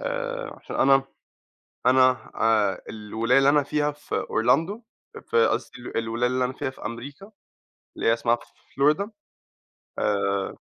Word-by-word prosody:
آآ، -, -, -3 dB
عشان -, -, -7 dB
أنا 135 Hz, 0 st, +4 dB, 0.8 s
أنا 130 Hz, 0 st, +4 dB
آآ، 105 Hz, -4 st, +2 dB
الولاية 110 Hz, +3 st, 0 dB
اللي 135 Hz, 0 st, +5 dB
أنا 145 Hz, 0 st, +4 dB
فيها 150 Hz, +1 st, 0 dB
في 145 Hz, 0 st, -6 dB
Orlando 160 Hz, -, +1 dB, 0.3 s
أ -, -, -7 dB
في 460 Hz, +1 st, +2 dB
قصدي -, -, -3 dB, 0.2 s
الولاية 115 Hz, +2 st, 0 dB
اللي 125 Hz, -, -1 dB
أنا 125 Hz, -1 st, +2 dB
من 130 Hz, -, -6 dB
فيها 145 Hz, -, -1 dB
في 130 Hz, -, -14 dB
أمريكا 140 Hz, -, -7 dB, 0.7 s
اللي -, -, -3 dB
هي 115 Hz, -, +6 dB
اسمها 115 Hz, +1 st, +1 dB, 0.4 s
florida، 150 Hz, +8 st, +3 dB, 0.9 s
آآ 100 Hz, -1 st, 0 dB
130 Hz, 145 wpm, -25 LUFS, 115-150 Hz, 0.9 s, هي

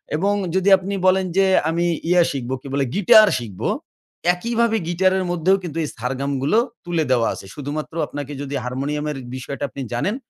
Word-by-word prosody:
এবং 195 Hz, +6 st, +1 dB, 0.2 s
যদি 190 Hz, +1 st, +3 dB
আপনি 190 Hz, +2 st, -5 dB
বলেন 190 Hz, 0 st, +3 dB
যে, 195 Hz, -, +5 dB, 0.2 s
"আমি 170 Hz, +2 st, 0 dB, 0.2 s
ইয়ে 180 Hz, 0 st, +5 dB
শিখবো" 130 Hz, -2 st, -4 dB
কি 140 Hz, -, -10 dB
বলে? 140 Hz, -1 st, +1 dB
"গিটার 215 Hz, +2 st, +7 dB
শিখব।" 105 Hz, -6 st, -9 dB, 0.7 s
একইভাবে 230 Hz, +4 st, 0 dB
গিটারের 185 Hz, +2 st, +2 dB
মধ্যেও 175 Hz, +3 st, +3 dB
কিন্তু 165 Hz, -2 st, -6 dB
এই -, -, -2 dB
সারগামগুলো 135 Hz, -, -1 dB, 0.3 s
তুলে 170 Hz, -2 st, 0 dB
দেওয়া 120 Hz, -3 st, +3 dB
আছে। -, -, -9 dB
শুধুমাত্র 150 Hz, +2 st, -5 dB
আপনাকে 145 Hz, 0 st, -6 dB
যদি 140 Hz, 0 st, -4 dB
হারমোনিয়ামের 145 Hz, +3 st, -3 dB, 0.2 s
বিষয়টা 140 Hz, +2 st, -6 dB
আপনি 140 Hz, -, -7 dB
জানেন, 190 Hz, -, -1 dB
155 Hz, 165 wpm, -21 LUFS, 140-190 Hz, 0.7 s, গিটার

